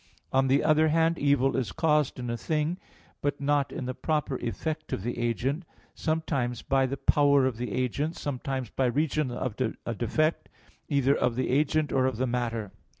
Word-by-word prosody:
On 135 Hz, 0 st, +4 dB
the 135 Hz, +2 st, +3 dB
other 155 Hz, 0 st, +4 dB
hand, 165 Hz, +1 st, +2 dB
evil 140 Hz, -2 st, +3 dB
is 130 Hz, -4 st, -1 dB
caused 150 Hz, -3 st, +1 dB
in 125 Hz, -2 st, -3 dB
a -, -, -1 dB
thing, 155 Hz, +7 st, -1 dB, 0.4 s
but 145 Hz, 0 st, -1 dB
not 140 Hz, 0 st, +1 dB
in 130 Hz, -, -5 dB
the 130 Hz, -, -2 dB
proper 150 Hz, -1 st, -1 dB
effect 155 Hz, -, -4 dB
of 95 Hz, -, -2 dB
the 120 Hz, +1 st, -3 dB
agent, 125 Hz, +7 st, -1 dB, 0.3 s
sometimes 145 Hz, -7 st, -1 dB
by 135 Hz, -1 st, +2 dB
the 140 Hz, +2 st, -3 dB
power 140 Hz, 0 st, +4 dB
of 130 Hz, -4 st, -1 dB
the 125 Hz, +1 st, -4 dB
agent, 135 Hz, +6 st, -1 dB
sometimes 130 Hz, -3 st, -4 dB
by 130 Hz, -, +1 dB
reason 150 Hz, +2 st, 0 dB
of 125 Hz, -1 st, -3 dB, 0.3 s
a 115 Hz, -, -2 dB
defect, 155 Hz, +8 st, 0 dB, 0.4 s
either 140 Hz, -2 st, +3 dB
of 125 Hz, -2 st, +1 dB
the 130 Hz, +1 st, -1 dB
agent 150 Hz, +1 st, +2 dB
or 130 Hz, -1 st, +3 dB
of 130 Hz, -4 st, -2 dB
the 130 Hz, -, +1 dB
matter. 115 Hz, -4 st, -2 dB
135 Hz, 185 wpm, -28 LUFS, 125-150 Hz, 0.4 s, On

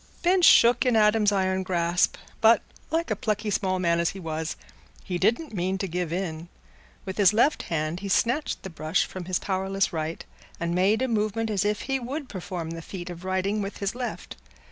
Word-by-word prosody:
Ben 360 Hz, +2 st, +4 dB
shook 240 Hz, -7 st, +6 dB
in 250 Hz, -3 st, +2 dB
Adam's 210 Hz, -1 st, +4 dB
iron 190 Hz, -1 st, +1 dB
grasp, 175 Hz, -1 st, +1 dB, 0.3 s
but, 225 Hz, +1 st, +6 dB, 0.3 s
like 330 Hz, +2 st, -1 dB
a -, -, +2 dB
plucky 215 Hz, -3 st, -2 dB
small 185 Hz, -1 st, 0 dB
man 170 Hz, -2 st, +1 dB
as 170 Hz, -, +2 dB
he 195 Hz, -, -7 dB
was, 160 Hz, -2 st, -4 dB, 0.5 s
he 180 Hz, -2 st, -3 dB
didn't 230 Hz, -, +1 dB
mean 190 Hz, 0 st, -1 dB
to 195 Hz, -, -3 dB
give 175 Hz, -1 st, -3 dB
in. 170 Hz, -2 st, -4 dB, 0.6 s
With 190 Hz, -1 st, -5 dB
his 200 Hz, 0 st, +6 dB
left 240 Hz, +8 st, +3 dB
hand 155 Hz, +1 st, -1 dB
he 200 Hz, 0 st, -5 dB
snatched 245 Hz, +9 st, +1 dB
the 190 Hz, -, -7 dB
brush 160 Hz, +2 st, 0 dB
from 185 Hz, -2 st, -7 dB
his 185 Hz, 0 st, 0 dB
powerless 190 Hz, 0 st, -1 dB
right, 160 Hz, 0 st, -4 dB, 0.3 s
and 170 Hz, 0 st, -1 dB
made 195 Hz, +7 st, +2 dB
a -, -, +1 dB
movement 220 Hz, -1 st, -1 dB
as 205 Hz, -1 st, +1 dB
if 210 Hz, +1 st, 0 dB
he 270 Hz, 0 st, -1 dB
would 265 Hz, +3 st, -5 dB
perform 175 Hz, -3 st, -5 dB
the 165 Hz, 0 st, -6 dB
feat 175 Hz, +1 st, -7 dB
of 175 Hz, +1 st, -9 dB
writing 190 Hz, +3 st, -1 dB
with 195 Hz, 0 st, -5 dB
his 200 Hz, -1 st, -2 dB
left. 245 Hz, 0 st, -6 dB
190 Hz, 200 wpm, -26 LUFS, 175-220 Hz, 0.6 s, shook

